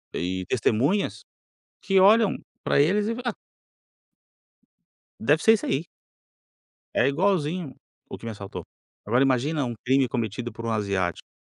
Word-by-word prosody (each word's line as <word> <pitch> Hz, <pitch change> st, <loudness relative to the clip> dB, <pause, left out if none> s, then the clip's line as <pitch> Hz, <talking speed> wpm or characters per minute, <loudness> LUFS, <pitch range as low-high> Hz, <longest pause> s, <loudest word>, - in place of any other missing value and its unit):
e 90 Hz, +1 st, -2 dB
testemunhas, 130 Hz, -, 0 dB, 0.6 s
que 195 Hz, -1 st, +3 dB
olham 210 Hz, +2 st, +5 dB, 0.3 s
para -, -, +2 dB
eles 200 Hz, +8 st, +3 dB
e 230 Hz, -, -1 dB
fala: 245 Hz, 0 st, -3 dB
"Ah" 225 Hz, -, -4 dB, 1.9 s
"deve 150 Hz, +7 st, +2 dB
ser 225 Hz, -, +7 dB
esse 215 Hz, -, -1 dB
aí". 145 Hz, +5 st, -1 dB, 1.1 s
"É -, -, +3 dB
igualzinho 165 Hz, -1 st, 0 dB, 0.3 s
o -, -, -7 dB
que -, -, -12 dB
me 115 Hz, -, -3 dB
assaltou". 100 Hz, -1 st, -8 dB, 0.4 s
Agora 120 Hz, +5 st, +3 dB
imagina 135 Hz, +2 st, +1 dB
um 120 Hz, -, -3 dB
crime 130 Hz, +1 st, +3 dB
cometido 120 Hz, -1 st, -3 dB
por 115 Hz, +1 st, -8 dB
um 115 Hz, -, -1 dB
asiático 100 Hz, -5 st, -2 dB
135 Hz, 140 wpm, -25 LUFS, 115-185 Hz, 1.9 s, ser